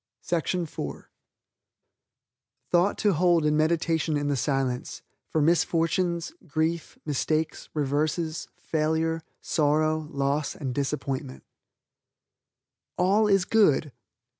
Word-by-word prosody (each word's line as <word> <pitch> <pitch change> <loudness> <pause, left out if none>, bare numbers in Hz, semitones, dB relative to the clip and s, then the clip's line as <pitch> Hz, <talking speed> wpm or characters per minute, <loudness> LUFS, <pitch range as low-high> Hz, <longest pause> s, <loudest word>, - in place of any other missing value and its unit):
THOUGHT 175 +2 -4
TO 205 -2 +2
HOLD 170 -1 +3
IN 150 0 +3
MEDITATION 160 0 +1
IN 145 0 -1
THE 145 - +1
SILENCE 130 -1 -2 0.2
FOR 155 - +1
MISFORTUNES, 170 - +1
GRIEF, 160 +2 -1
MISTAKES, 155 +2 -1
REVERSES, 155 +3 -1
FAILURE, 160 +1 0 0.2
SORROW, 155 0 +1
LOSS 140 0 -1
AND 140 -9 -4
DISAPPOINTMENT 135 - -3 1.5
"All 200 +4 +3
is 195 -2 +3
Good." 155 -9 +3
155 Hz, 90 wpm, -26 LUFS, 145-170 Hz, 1.5 s, HOLD